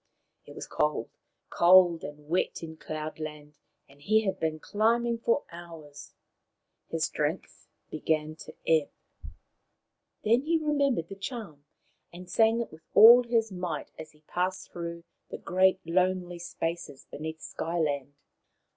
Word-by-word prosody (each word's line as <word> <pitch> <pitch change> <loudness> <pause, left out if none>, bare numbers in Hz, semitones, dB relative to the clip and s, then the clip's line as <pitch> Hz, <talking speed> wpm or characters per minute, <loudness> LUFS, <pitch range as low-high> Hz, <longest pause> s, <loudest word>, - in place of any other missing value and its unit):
It - - -12
was - - -6
cold, 150 -6 -1 0.4
cold 175 -1 +6
and 150 0 -9
wet 170 +1 -1
in 160 -1 -7
Cloud 155 0 -6
land, 150 -1 -8 0.3
and 140 +1 -21
he 215 +8 +3
had 195 - -1
been 155 -1 -1
climbing 230 +5 +1
for 235 +4 +1
hours. 165 -4 -11 0.7
His 165 0 -1
strength 150 +4 -4 0.2
began 155 0 -1
to - - -11
ebb. 160 -3 +3 1.3
Then 230 +4 +3
he 325 +3 +1
remembered 285 - 0
the 195 - -7
charm, 195 - -7 0.5
and 180 +1 -11
sang 225 +5 +3
it 235 - -6
with 155 - -14
all 235 +4 +10
his 230 -3 0
might 180 -4 -4
as 155 0 -9
he 150 - -25
passed 180 +4 -3
through 170 -1 -6 0.3
the - - -6
great 185 +1 +2
lonely 180 0 0
spaces 170 -4 -5
beneath 160 +1 -6
Sky 165 +2 -4
land. 145 -3 -1
170 Hz, 140 wpm, -28 LUFS, 155-205 Hz, 1.3 s, all